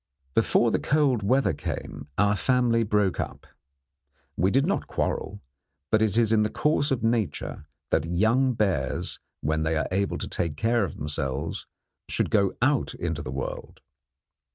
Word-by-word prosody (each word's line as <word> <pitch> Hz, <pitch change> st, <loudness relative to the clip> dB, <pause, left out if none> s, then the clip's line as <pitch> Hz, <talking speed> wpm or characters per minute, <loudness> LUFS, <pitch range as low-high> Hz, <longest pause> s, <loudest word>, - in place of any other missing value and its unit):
Before -, -, +3 dB
the -, -, +1 dB
cold 140 Hz, -6 st, +2 dB
weather 105 Hz, -2 st, +2 dB
came 70 Hz, -, -5 dB
our 105 Hz, 0 st, +3 dB
family 120 Hz, +1 st, +2 dB
broke 105 Hz, -4 st, +1 dB
up. -, -, -4 dB, 0.9 s
We 90 Hz, +4 st, +2 dB
did 135 Hz, +6 st, +3 dB
not 195 Hz, -, -1 dB
quarrel; 100 Hz, +1 st, -2 dB, 0.5 s
but 110 Hz, -, +4 dB
it 110 Hz, -1 st, +2 dB
is 115 Hz, -2 st, +3 dB
in 110 Hz, -1 st, +4 dB
the 105 Hz, -, +1 dB
course 150 Hz, +2 st, +1 dB
of 130 Hz, -4 st, -1 dB
nature 115 Hz, -8 st, -1 dB, 0.2 s
that 80 Hz, -, +2 dB
young 110 Hz, +10 st, +2 dB
bears, 90 Hz, -, -1 dB, 0.2 s
when 80 Hz, +1 st, 0 dB
they 80 Hz, 0 st, +1 dB
are 80 Hz, -, 0 dB
able 100 Hz, +2 st, 0 dB
to -, -, -5 dB
take 85 Hz, -5 st, -2 dB
care 115 Hz, +2 st, +2 dB
of 95 Hz, -, -4 dB
themselves, 75 Hz, 0 st, -3 dB, 0.4 s
should -, -, 0 dB
go 100 Hz, -4 st, +2 dB
out 140 Hz, -1 st, +1 dB
into 80 Hz, -3 st, -3 dB
the -, -, -6 dB
world. 65 Hz, +1 st, -5 dB
105 Hz, 160 wpm, -26 LUFS, 80-120 Hz, 0.9 s, but